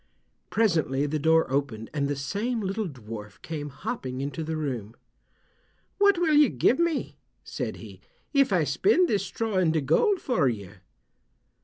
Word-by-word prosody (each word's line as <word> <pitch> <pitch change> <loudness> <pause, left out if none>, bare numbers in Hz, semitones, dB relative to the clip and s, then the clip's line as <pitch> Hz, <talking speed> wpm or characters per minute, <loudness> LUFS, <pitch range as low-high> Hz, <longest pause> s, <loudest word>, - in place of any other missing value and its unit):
Presently 160 - +1
the 150 +1 -1
door 160 +2 +4
opened, 135 -6 -2
and 140 -2 0
the 145 - -1
same 205 - -2
little 200 +1 -2
dwarf 110 -6 -9
came 150 -2 -5
hopping 140 - -5
into 140 +3 -3
the 160 0 -3
room. 125 -8 -4 1.0
"What 400 -2 +5
will 335 -3 +2
you 295 -3 +6
give 265 - +2
me," 340 -3 -1 0.2
said - - -4
he, - - -12 0.3
"if 275 -5 +4
I 180 -4 +3
spin 360 - +3
this 210 - 0
straw 210 +2 -2
into 165 -3 +3
gold 260 - +2
for 230 - +1
you?" 100 -5 -5
160 Hz, 155 wpm, -26 LUFS, 135-225 Hz, 1.0 s, you